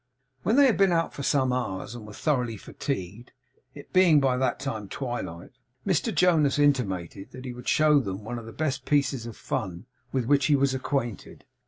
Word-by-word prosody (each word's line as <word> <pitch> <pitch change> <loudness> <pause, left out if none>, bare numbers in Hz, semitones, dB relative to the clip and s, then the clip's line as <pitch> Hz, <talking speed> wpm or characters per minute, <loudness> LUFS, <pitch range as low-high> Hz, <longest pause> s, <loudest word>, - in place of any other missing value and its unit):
When 220 - +1
they 285 0 +7
had 250 - +3
been 195 -2 +4
out 165 -1 +1
for - - -6
some 135 -2 +2
hours 110 -4 -3
and 115 -3 -9
were 105 - -10
thoroughly 125 -5 -1
fatigued, 105 -1 -5 0.4
it - - -12
being 180 -5 +6
by 135 -2 +2
that 125 -1 0
time 110 -8 -4
twilight, 120 -10 -5 0.3
Mr 195 +4 +1
Jonas 165 -8 +3
intimated 100 - 0
that 130 0 -9
he 125 - -5
would 125 0 -11
show 150 -1 +4
them 100 -5 -4
one 120 +2 -5
of 115 - -11
the - - -8
best 140 -1 -2
pieces 140 -5 +1
of 115 - -9
fun 95 -6 -4 0.3
with 130 -3 -1
which 140 +2 +3
he 150 - +4
was 140 -1 +2
acquainted. 130 -4 -3
130 Hz, 195 wpm, -26 LUFS, 115-145 Hz, 0.4 s, they